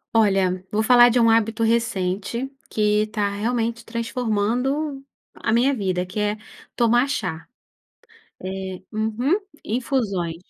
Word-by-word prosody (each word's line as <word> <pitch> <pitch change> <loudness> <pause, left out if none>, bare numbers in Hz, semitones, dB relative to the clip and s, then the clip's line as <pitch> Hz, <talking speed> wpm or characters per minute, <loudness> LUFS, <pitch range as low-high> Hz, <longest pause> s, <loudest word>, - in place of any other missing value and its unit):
Olha, 195 -4 +2
vou 215 +1 +1
falar 245 +1 +7
de 245 +1 +2
um 230 - +5
hábito 225 0 +2
recente, 225 +1 0 0.2
que 210 0 +2
tá 210 -2 -1
realmente 230 +2 -2
transformando 245 +5 -1 0.3
a 225 - -2
minha 245 +5 +3
vida, 185 -6 -1
que 185 +4 -6
é 210 0 0 0.4
tomar 240 +2 +3
chá. 160 - -3 0.9
É, 190 -1 -5
uhum, 220 - 0 0.3
infusões. 215 - -1
225 Hz, 120 wpm, -23 LUFS, 200-240 Hz, 0.9 s, falar